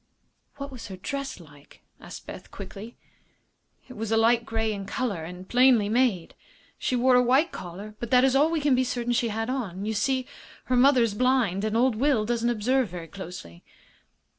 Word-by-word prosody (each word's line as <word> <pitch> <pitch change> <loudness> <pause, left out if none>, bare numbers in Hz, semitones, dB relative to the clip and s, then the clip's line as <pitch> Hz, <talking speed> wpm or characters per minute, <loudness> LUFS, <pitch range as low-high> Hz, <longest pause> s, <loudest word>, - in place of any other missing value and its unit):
"What 280 0 -7
was 235 -3 -9
her 190 -2 -8
dress 275 +7 -5
like?" 145 -3 -18 0.2
asked - - -10
Beth, - - -10
quickly. 215 +4 -9 0.9
"It 255 - -10
was 225 0 -4
a 225 - +3
light 230 +1 +3
grey 225 -1 -1
in 200 -1 -6
color, 200 -7 -2
and 180 +3 -9
plainly 245 -4 +4
made. 225 -7 +1 0.5
She 255 - -1
wore 255 +1 +3
a 250 - +6
white 265 +7 +3
collar, 190 +4 -8
but 235 - -5
that 250 0 +5
is 265 0 +3
all 295 +4 +4
we 325 -2 -1
can 285 -2 +3
be 255 0 +3
certain 245 -1 -2
she 240 0 +1
had 225 +1 -3
on. 210 -8 -3
You 220 - -1
see 260 +4 0 0.4
her 255 - 0
mother 255 0 +5
is 225 -3 0
blind, 235 -5 +1
and 215 +1 0
old 250 0 +3
Will 260 -4 +2
doesn't 235 +1 0
observe 240 +1 +1
very 170 -1 -7
closely." 170 - -10
235 Hz, 195 wpm, -26 LUFS, 205-255 Hz, 0.9 s, a